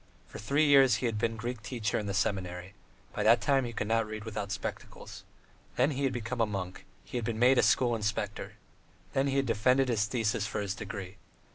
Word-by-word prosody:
For - - -10
three 140 +8 +2
years 135 -5 +6
he 105 - -2
had 115 -3 -1
been 115 +1 0
Greek 120 +1 -5
teacher 110 +2 -2
in 105 - -4
the 100 - -2
seminary: 95 -2 -2 0.4
by - - -3
that 115 +2 +5
time 135 -2 +2
he 120 - -4
could 110 - -3
not 115 0 +1
read 110 -1 -6
without 105 -2 -5
spectacles. - - -6 0.5
Then 130 +5 +3
he 140 0 -1
had 135 - +1
become 120 0 -3
a 115 - +3
monk; 95 -3 -5 0.2
he 125 - -4
had - - -5
been 115 -1 -2
made 125 +3 +5
a - - +6
school 120 -2 +3
inspector. 105 -2 -3 0.6
Then 135 +1 +1
he 135 0 0
had 135 - +2
defended 125 +3 +2
his 110 -3 +2
thesis 105 -3 -1
for 105 - -3
his 100 -2 -2
degree. 100 -2 -7
115 Hz, 220 wpm, -30 LUFS, 105-125 Hz, 0.6 s, years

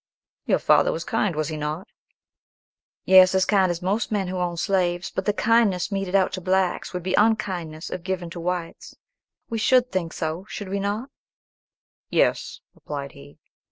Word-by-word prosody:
"Your - - +3
father - - +3
was - - -4
kind, 190 -6 -1
was 155 0 -1
he 155 - -4
not?" 155 +7 -4 1.2
"Yes, 185 0 +7
as 190 -1 +3
kind 195 -3 +3
as 175 0 -3
most 205 +6 -1
men 195 -3 -1
who 185 - -3
own 175 -1 -2
slaves; 175 -1 0
but 190 - -3
the 210 - +3
kindness 215 -4 +2
meted 195 -1 -2
out 190 -1 +3
to 185 - -4
blacks 185 0 0
would 180 -1 -5
be 185 +1 -2
unkindness 185 -7 0
if 180 - -4
given 180 -1 -4
to 170 - -7
whites. 175 -1 -4 0.6
We 225 -1 -2
would 255 -1 +4
think 175 -3 -2
so, 165 +5 -4
should 205 -3 -6
we 200 +1 -2
not?" 210 +7 -3 1.0
"Yes," - - 0
replied 140 -1 -7
he. 70 +2 -15
185 Hz, 175 wpm, -24 LUFS, 170-200 Hz, 1.2 s, Yes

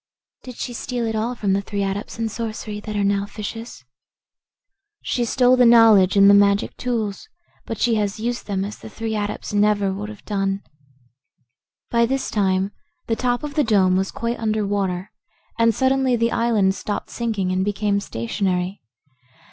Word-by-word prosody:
"Did 250 -2 -10
she 245 - -5
steal 240 0 -3
it 225 0 -2
all 230 +3 -1
from 200 -4 0
the 200 - +1
three 200 0 -3
Adepts 195 +3 -4
in 225 0 -1
Sorcery 220 -1 -5
that 210 0 -6
are 205 - +1
now 200 0 +1
fishes?" 215 - -7 1.2
"She 245 - -1
stole 250 +2 +4
the 250 - +4
knowledge 220 -5 +6
and 200 0 +7
the 200 - +8
magic 200 +1 +3
tools, 230 - -3 0.4
but 225 - -4
she 240 - +2
has 205 +1 -2
used 240 +1 -3
them 195 -2 -1
as 210 - -7
the - - -10
three 220 0 -4
Adepts 210 0 -4
never 205 -1 +2
would 205 +2 -5
have 215 -2 -12
done." 195 -1 -1 1.3
By 235 0 +3
this 270 +2 -2
time 190 -1 +1 0.3
the 225 - 0
top 245 +3 -1
of 295 -1 -5
the 300 0 +2
dome 190 -6 +3
was 190 +1 0
quite 235 +1 -3
under 215 -1 0
water 195 -1 -2 0.5
and 230 0 +5
suddenly 265 0 +2
the 230 0 +1
island 220 -5 +2
stopped 205 +1 -5
sinking 215 -6 -2
and 185 0 +1
became 205 0 0
stationary. 180 - -2
210 Hz, 175 wpm, -22 LUFS, 200-230 Hz, 1.3 s, the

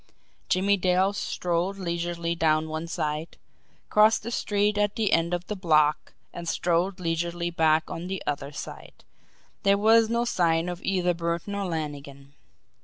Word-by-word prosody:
Jimmie 200 +2 +3
Dale 185 +2 +2
strolled 180 0 -2
leisurely 170 -2 -2
down 160 -1 +1
one 160 +1 -4
side, 155 0 -3 0.5
crossed 215 +1 +5
the 235 - -5
street 205 -2 0
at 205 0 +1
the 215 -3 0
end 165 +1 +2
of 175 0 -2
the 210 - -4
block, 155 -5 +2 0.2
and 170 -1 -5
strolled 180 +2 0
leisurely 170 0 -2
back 160 -1 +2
on 170 +2 -5
the 190 0 -4
other 140 -1 -3
side - - -9 0.6
there 200 0 +4
was 220 +2 +5
no 235 +1 +1
sign 170 -5 +1
of 175 0 -6
either 180 -2 +1
Burton 170 +3 -3
or 200 -1 -2
Lannigan. 145 -4 -6
175 Hz, 155 wpm, -26 LUFS, 165-195 Hz, 0.6 s, crossed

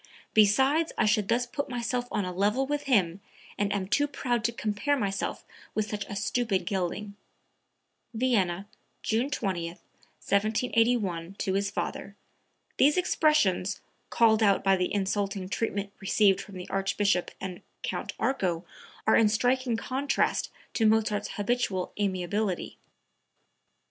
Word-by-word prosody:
Besides 265 +10 +4
I - - +3
should 210 -2 +2
thus 240 +2 +2
put 285 +4 -4
myself 245 0 -2
on 205 - 0
a 180 - -4
level 210 +8 +1
with 290 +1 -2
him, 195 -8 +2 0.3
and 205 0 0
I - - +1
am 190 -2 -2
too 290 +8 +2
proud 245 -4 -1
to 235 - +2
compare 220 +6 -1
myself 195 -5 -2 0.3
with 215 -1 0
such 205 -1 -3
a 205 - -7
stupid 200 -2 0
gelding." 195 +2 -2 1.0
(Vienna, 205 -6 0 0.4
June 230 +5 +1
20, 185 -10 -2
1781, 205 0 -1
to 190 - -2
his 200 +1 0
father. 200 0 -4 0.6
These 290 +4 +5
expressions, 300 - +2 0.3
called 225 -1 +4
out 200 -3 +4
by 195 -1 +4
the 180 -1 -1
insulting 200 -1 -1
treatment 200 -1 -2
received 195 0 +3
from 200 -3 -10
the 180 - -7
Archbishop 195 -1 +1
and 185 -2 -6 0.2
Count - - -3
Arco, 185 -10 0 0.4
are - - +5
in 225 -2 +5
striking 245 +2 +1
contrast 270 +4 0 0.2
to 225 - +3
Mozart's 215 -1 +1
habitual 205 -4 -1
amiability.) 190 0 -1
210 Hz, 135 wpm, -28 LUFS, 195-240 Hz, 1.0 s, These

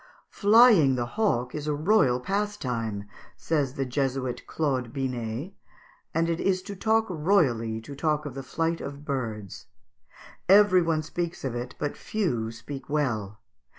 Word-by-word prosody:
"Flying 205 - +6
the 120 -1 -1
hawk 125 - 0
is 150 0 -5
a 150 - +1
royal 150 - +3
pastime," 125 - -2 0.3
says 145 -5 -1
the 135 - -1
Jesuit 130 -1 -2
Claude 130 -6 -1
Binet, 130 - -3 0.6
"and 165 +1 +1
it 170 0 -1
is 185 -1 +1
to 200 +1 -7
talk 220 +3 +2
royally 150 - +1
to 140 +6 -9
talk 150 +1 0
of 145 - -5
the 135 - -5
flight 165 +5 -2
of 140 +1 -7
birds. 110 -9 -4 0.8
Every 195 -2 +7
one 165 -2 0
speaks 170 +2 -4
of 130 - -2
it, 120 +1 -5
but 145 - -3
few 120 - -2
speak 135 +5 -9
well. 115 -9 -1
145 Hz, 150 wpm, -27 LUFS, 125-175 Hz, 0.8 s, Every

